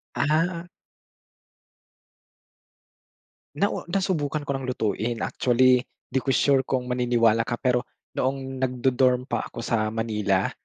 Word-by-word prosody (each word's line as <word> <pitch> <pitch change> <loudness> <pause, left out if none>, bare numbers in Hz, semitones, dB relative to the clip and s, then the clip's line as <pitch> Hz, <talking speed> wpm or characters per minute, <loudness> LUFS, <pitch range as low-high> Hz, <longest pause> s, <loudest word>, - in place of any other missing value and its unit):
Ah. 165 +4 0 2.9
Nau 200 -3 -1
nasubukan 165 -6 -1
ko 140 - -3
ng 135 -1 -5
lutuin. 115 -1 -1
Actually, 125 0 +3 0.3
'di 130 - +2
ko 135 - -4
sure 140 -2 +4
kung 130 -2 0
maniniwala 115 -2 +2
ka, 120 - -1
pero 125 0 0 0.3
noong 135 0 -2
nagdo-dorm 125 0 +2
pa - - -3
ako 115 - -8
sa 110 -3 0
Manila, 105 -4 0
125 Hz, 115 wpm, -25 LUFS, 115-135 Hz, 2.9 s, sure